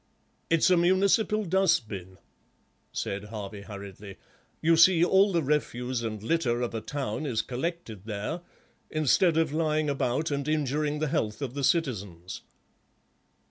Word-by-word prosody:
"It's 165 Hz, +2 st, +4 dB
a 180 Hz, -, +5 dB
municipal 200 Hz, +4 st, +3 dB
dust 170 Hz, -, +2 dB
bin," 95 Hz, -3 st, -8 dB, 0.7 s
said 100 Hz, +1 st, -4 dB
Harvey 105 Hz, -2 st, -7 dB
hurriedly; 100 Hz, -1 st, -9 dB, 0.4 s
"you 165 Hz, +1 st, +4 dB
see 170 Hz, +1 st, +6 dB
all 195 Hz, +2 st, +4 dB
the 170 Hz, -3 st, +1 dB
refuse 130 Hz, -4 st, -1 dB
and 110 Hz, -2 st, -4 dB
litter 120 Hz, -3 st, +1 dB
of 120 Hz, -, -3 dB
a 115 Hz, -, -3 dB
town 145 Hz, +3 st, -3 dB
is 115 Hz, -5 st, 0 dB
collected 125 Hz, -, -5 dB
there, 110 Hz, +11 st, -4 dB, 0.5 s
instead 155 Hz, +3 st, +3 dB
of 160 Hz, -3 st, +1 dB
lying 155 Hz, -2 st, +1 dB
about 140 Hz, +3 st, -1 dB
and 140 Hz, 0 st, -2 dB
injuring 150 Hz, 0 st, 0 dB
the 155 Hz, +1 st, -1 dB
health 110 Hz, -6 st, -1 dB
of 135 Hz, -4 st, -4 dB
the 140 Hz, 0 st, -4 dB
citizens." 100 Hz, -, -1 dB
145 Hz, 140 wpm, -28 LUFS, 110-165 Hz, 0.7 s, see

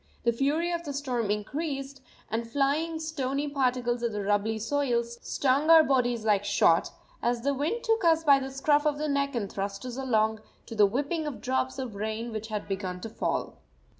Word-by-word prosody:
The 235 Hz, -, +2 dB
fury 295 Hz, +8 st, 0 dB
of 340 Hz, 0 st, -2 dB
the 290 Hz, -3 st, -5 dB
storm 250 Hz, -6 st, -2 dB
increased, 275 Hz, +5 st, -3 dB, 0.3 s
and 230 Hz, +1 st, -2 dB
flying 290 Hz, +5 st, 0 dB
stony 290 Hz, -3 st, -2 dB
particles 250 Hz, -4 st, 0 dB
of 235 Hz, -2 st, -1 dB
the 205 Hz, -1 st, -3 dB
rubbly 205 Hz, +2 st, +1 dB
soil 240 Hz, +1 st, 0 dB
stung 260 Hz, +5 st, 0 dB
our 325 Hz, -1 st, +9 dB
bodies 245 Hz, -5 st, +1 dB
like 205 Hz, -2 st, +3 dB
shot, 175 Hz, -4 st, +3 dB, 0.3 s
as 240 Hz, 0 st, 0 dB
the 280 Hz, +1 st, +2 dB
wind 305 Hz, -, -2 dB
took 450 Hz, -2 st, +1 dB
us 325 Hz, -1 st, +4 dB
by 280 Hz, -3 st, +6 dB
the 270 Hz, 0 st, -4 dB
scruff 290 Hz, +2 st, +2 dB
of 295 Hz, -1 st, +1 dB
the 305 Hz, +1 st, -2 dB
neck 280 Hz, -1 st, 0 dB
and 215 Hz, -4 st, -1 dB
thrust 200 Hz, +2 st, -4 dB
us 250 Hz, 0 st, -5 dB
along, 220 Hz, -4 st, +1 dB, 0.3 s
to -, -, -8 dB
the 210 Hz, -2 st, +5 dB
whipping 290 Hz, -, -2 dB
of 290 Hz, -, -5 dB
drops 260 Hz, +1 st, -1 dB
of 255 Hz, -4 st, -4 dB
rain 220 Hz, +3 st, -3 dB
which 220 Hz, 0 st, -5 dB
had 215 Hz, -2 st, -4 dB
begun 190 Hz, -2 st, -3 dB
to 225 Hz, -, -6 dB
fall. -, -, -3 dB
260 Hz, 195 wpm, -28 LUFS, 220-285 Hz, 0.3 s, our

